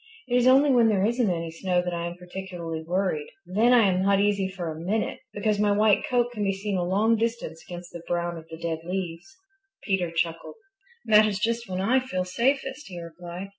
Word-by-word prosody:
It 245 Hz, -, 0 dB
is 250 Hz, 0 st, +4 dB
only 275 Hz, +2 st, +6 dB
when 240 Hz, -3 st, +5 dB
there 200 Hz, -3 st, +2 dB
isn't 235 Hz, -1 st, +1 dB
any 165 Hz, -2 st, -2 dB
snow 180 Hz, +2 st, 0 dB
that 180 Hz, 0 st, -3 dB
I 170 Hz, 0 st, -2 dB
am 170 Hz, -, -6 dB
particularly 180 Hz, -3 st, -6 dB
worried. 175 Hz, -2 st, -1 dB, 0.2 s
Then 215 Hz, +7 st, +3 dB
I 235 Hz, -4 st, +6 dB
am 185 Hz, -1 st, +1 dB
not 195 Hz, 0 st, +3 dB
easy 200 Hz, -1 st, +2 dB
for 180 Hz, -4 st, -5 dB
a 155 Hz, -, -7 dB
minute, 205 Hz, +6 st, -1 dB
because 205 Hz, 0 st, 0 dB
my 205 Hz, -1 st, +3 dB
white 210 Hz, 0 st, +3 dB
coat 245 Hz, -1 st, +2 dB
can 215 Hz, -4 st, -3 dB
be 195 Hz, -1 st, +1 dB
seen 200 Hz, +1 st, -3 dB
a 180 Hz, -, 0 dB
long 210 Hz, +6 st, +2 dB
distance 225 Hz, -8 st, -3 dB
against 175 Hz, 0 st, -9 dB
the 170 Hz, -, -7 dB
brown 175 Hz, 0 st, -1 dB
of 165 Hz, -1 st, -10 dB
the 160 Hz, -, -8 dB
dead 165 Hz, -1 st, -3 dB
leaves." 180 Hz, -, -5 dB, 0.5 s
Peter 190 Hz, -4 st, 0 dB
chuckled, 165 Hz, -, -2 dB, 0.5 s
"that 215 Hz, -1 st, +6 dB
is 205 Hz, -2 st, -1 dB
just 230 Hz, +2 st, -1 dB
when 185 Hz, 0 st, -2 dB
I 245 Hz, +7 st, +3 dB
feel 185 Hz, -8 st, -3 dB
safest," 265 Hz, +7 st, -1 dB
he 180 Hz, -2 st, -7 dB
replied. 175 Hz, +3 st, -8 dB
190 Hz, 215 wpm, -26 LUFS, 175-220 Hz, 0.5 s, only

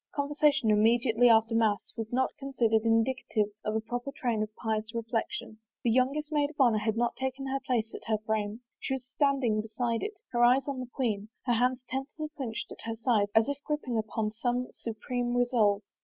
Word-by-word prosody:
Conversation 285 Hz, -4 st, +2 dB
immediately 230 Hz, +2 st, +4 dB
after 225 Hz, 0 st, +5 dB
mass 220 Hz, -3 st, +1 dB
was 225 Hz, -2 st, -5 dB
not 260 Hz, +1 st, +1 dB
considered 235 Hz, -5 st, +1 dB
indicative 225 Hz, -2 st, +1 dB
of 215 Hz, 0 st, -1 dB
a -, -, +2 dB
proper 245 Hz, +4 st, -4 dB
train 240 Hz, -6 st, -1 dB
of 215 Hz, -, -1 dB
pious 220 Hz, 0 st, -3 dB
reflection. 230 Hz, -, -3 dB, 0.2 s
The 235 Hz, -, +3 dB
youngest 275 Hz, +5 st, +1 dB
maid 295 Hz, -1 st, +2 dB
of 300 Hz, -, -16 dB
honor 235 Hz, -5 st, +5 dB
had 220 Hz, +1 st, -1 dB
not 240 Hz, 0 st, +1 dB
taken 265 Hz, +1 st, -3 dB
her 270 Hz, 0 st, -1 dB
place 235 Hz, -4 st, -1 dB
at -, -, -8 dB
her 220 Hz, -1 st, +1 dB
frame. 215 Hz, +1 st, -2 dB, 0.2 s
She 265 Hz, -, -2 dB
was 255 Hz, -2 st, -7 dB
standing 265 Hz, -5 st, +1 dB
beside 230 Hz, +1 st, -2 dB
it, 425 Hz, -2 st, -5 dB
her 240 Hz, 0 st, +2 dB
eyes 255 Hz, +3 st, +5 dB
on 275 Hz, -2 st, -3 dB
the 255 Hz, -, -5 dB
queen, 220 Hz, -5 st, -2 dB, 0.2 s
her 245 Hz, -, +2 dB
hands 250 Hz, +2 st, +1 dB
tensely 280 Hz, +4 st, -4 dB
clinched 235 Hz, -6 st, -4 dB
at -, -, -9 dB
her 225 Hz, 0 st, -4 dB
sides 225 Hz, -3 st, +2 dB
as 220 Hz, 0 st, +5 dB
if 285 Hz, 0 st, -3 dB
grip 300 Hz, -1 st, -2 dB
ping 240 Hz, -3 st, -1 dB
upon 215 Hz, 0 st, -2 dB
some 245 Hz, +3 st, -1 dB
supreme 240 Hz, +2 st, -3 dB
resolve. 220 Hz, -5 st, +3 dB
240 Hz, 200 wpm, -29 LUFS, 220-265 Hz, 0.2 s, after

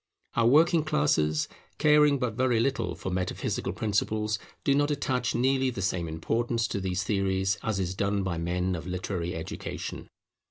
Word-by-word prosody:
Our 115 Hz, -1 st, +3 dB
working 160 Hz, +5 st, +5 dB
classes, 145 Hz, -, +1 dB, 0.3 s
caring 150 Hz, -1 st, +5 dB
but 125 Hz, -4 st, -1 dB
very 125 Hz, 0 st, +2 dB
little 115 Hz, -9 st, 0 dB
for 95 Hz, +2 st, -5 dB
metaphysical 90 Hz, 0 st, -2 dB
principles, 105 Hz, 0 st, 0 dB, 0.2 s
do 140 Hz, -, +3 dB
not 145 Hz, +1 st, +2 dB
attach 130 Hz, -4 st, -1 dB
nearly 130 Hz, +2 st, +2 dB
the 100 Hz, -6 st, -4 dB
same 90 Hz, -3 st, -1 dB
importance 115 Hz, +9 st, -1 dB
to 100 Hz, -, -2 dB
these 90 Hz, 0 st, -1 dB
theories 95 Hz, -1 st, 0 dB
as 110 Hz, -3 st, -1 dB
is 90 Hz, -1 st, -1 dB
done 100 Hz, +1 st, 0 dB
by 90 Hz, -3 st, -2 dB
men 90 Hz, +2 st, -1 dB
of 85 Hz, +1 st, -6 dB
literary 90 Hz, -1 st, -3 dB
education. 80 Hz, -, -6 dB
105 Hz, 160 wpm, -28 LUFS, 90-130 Hz, 0.3 s, working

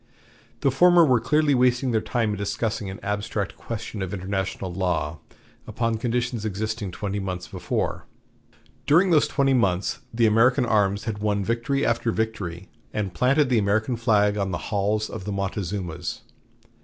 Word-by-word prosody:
The 135 Hz, -, +3 dB
former 175 Hz, +4 st, +6 dB
were 130 Hz, -5 st, +4 dB
clearly 150 Hz, +5 st, +2 dB
wasting 125 Hz, 0 st, +2 dB
their 110 Hz, -2 st, +1 dB
time 115 Hz, -2 st, 0 dB
in -, -, -2 dB
discussing 105 Hz, +1 st, -2 dB
an 95 Hz, -, -7 dB
abstract 105 Hz, 0 st, -2 dB
question 110 Hz, -2 st, -6 dB
of 95 Hz, +1 st, -3 dB
international 95 Hz, -1 st, -3 dB
law 85 Hz, -4 st, -1 dB, 0.5 s
upon 115 Hz, -1 st, -1 dB
conditions 120 Hz, -1 st, -1 dB
existing 110 Hz, 0 st, -3 dB
twenty 100 Hz, +3 st, -4 dB
months 90 Hz, -2 st, -4 dB
before. -, -, -3 dB, 0.8 s
During 175 Hz, +5 st, +5 dB
those 155 Hz, -3 st, +4 dB
twenty 135 Hz, -1 st, +2 dB
months 100 Hz, -7 st, +1 dB
the 115 Hz, 0 st, +2 dB
American 125 Hz, +4 st, +4 dB
arms 100 Hz, -3 st, +1 dB
had 110 Hz, -2 st, -4 dB
won 105 Hz, -1 st, 0 dB
victory 120 Hz, +5 st, 0 dB
after 120 Hz, 0 st, +1 dB
victory, 100 Hz, -6 st, -3 dB, 0.2 s
and 100 Hz, -4 st, -3 dB
planted 130 Hz, -, +3 dB
the 120 Hz, -3 st, +3 dB
American 110 Hz, +4 st, +1 dB
flag 105 Hz, -3 st, +2 dB
on 100 Hz, -1 st, -1 dB
the 95 Hz, +4 st, -5 dB
"halls 105 Hz, +2 st, +1 dB
of 105 Hz, -4 st, -7 dB
the 105 Hz, -, -3 dB
Montezumas." 95 Hz, -3 st, -3 dB
110 Hz, 155 wpm, -24 LUFS, 100-120 Hz, 0.8 s, former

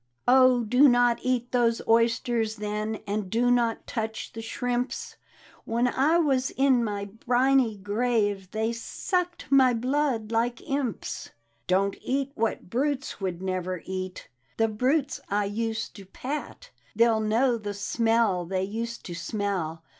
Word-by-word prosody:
" -, -, -50 dB
Oh, 255 Hz, -1 st, +6 dB
do 250 Hz, +6 st, +5 dB
not 245 Hz, -1 st, +3 dB
eat 250 Hz, -1 st, -1 dB
those 235 Hz, -2 st, +2 dB
oysters, 230 Hz, -1 st, +2 dB
then. 210 Hz, 0 st, -3 dB
And 205 Hz, -1 st, -2 dB
do 240 Hz, +4 st, +2 dB
not 235 Hz, -2 st, +1 dB
touch 220 Hz, -2 st, -4 dB
the 225 Hz, -, -6 dB
shrimps; 245 Hz, +2 st, -3 dB, 0.5 s
When 235 Hz, +2 st, +1 dB
I 285 Hz, +7 st, +3 dB
was 270 Hz, -6 st, +2 dB
in 265 Hz, -3 st, +3 dB
my 205 Hz, -2 st, -3 dB
briny 245 Hz, +2 st, +2 dB
grave 205 Hz, -2 st, 0 dB
They 220 Hz, +3 st, -1 dB
sucked 355 Hz, -, -3 dB
my 260 Hz, -3 st, +5 dB
blood 250 Hz, -2 st, 0 dB
like 235 Hz, +1 st, +1 dB
impsl 270 Hz, -2 st, -4 dB, 0.2 s
" 115 Hz, 0 st, -43 dB
Don't 195 Hz, +2 st, +1 dB
eat 275 Hz, +1 st, -1 dB
what 225 Hz, -6 st, -2 dB
brutes 270 Hz, +2 st, -2 dB
would 185 Hz, -1 st, -3 dB
never 185 Hz, -1 st, -3 dB
eat, 185 Hz, -1 st, -5 dB, 0.3 s
The 225 Hz, -, +3 dB
brutes 270 Hz, +6 st, 0 dB
I 205 Hz, +1 st, +1 dB
used 225 Hz, +2 st, -3 dB
to 195 Hz, -, -11 dB
pat, 275 Hz, +8 st, -6 dB, 0.2 s
They'll 230 Hz, 0 st, +4 dB
know 230 Hz, +3 st, +2 dB
the 205 Hz, -1 st, -5 dB
smell 225 Hz, -2 st, +1 dB
they 185 Hz, +2 st, -1 dB
used 230 Hz, +4 st, -5 dB
to 175 Hz, -, -6 dB
smell. 170 Hz, -3 st, -3 dB
230 Hz, 145 wpm, -27 LUFS, 205-250 Hz, 0.5 s, Oh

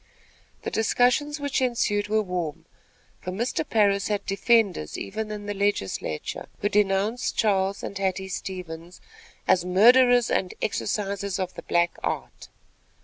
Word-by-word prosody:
The -, -, -3 dB
discussions 250 Hz, +6 st, +2 dB
which 285 Hz, -1 st, -1 dB
ensued 215 Hz, -5 st, +1 dB
were 215 Hz, +1 st, +1 dB
warm, 180 Hz, -5 st, -4 dB, 0.6 s
for -, -, -5 dB
Mr. 235 Hz, +10 st, -1 dB
Parris 200 Hz, -7 st, +2 dB
had 205 Hz, -1 st, -2 dB
defenders 200 Hz, -, +1 dB
even 215 Hz, +2 st, -4 dB
in 210 Hz, -1 st, -6 dB
the 205 Hz, -, -3 dB
legislature, 195 Hz, -, -2 dB
who 205 Hz, -, 0 dB
denounced 210 Hz, +4 st, +1 dB
Charles 195 Hz, -2 st, +1 dB
and -, -, -5 dB
Hattie 190 Hz, -1 st, -1 dB
Stevens 180 Hz, -2 st, -7 dB, 0.5 s
"as 175 Hz, -, +4 dB
murderers 245 Hz, +6 st, +5 dB
and 185 Hz, -, 0 dB
exercisers 200 Hz, -2 st, -2 dB
of 185 Hz, -1 st, -3 dB
the -, -, -8 dB
black 175 Hz, 0 st, 0 dB
art." -, -, -4 dB
200 Hz, 135 wpm, -25 LUFS, 185-220 Hz, 0.6 s, murderers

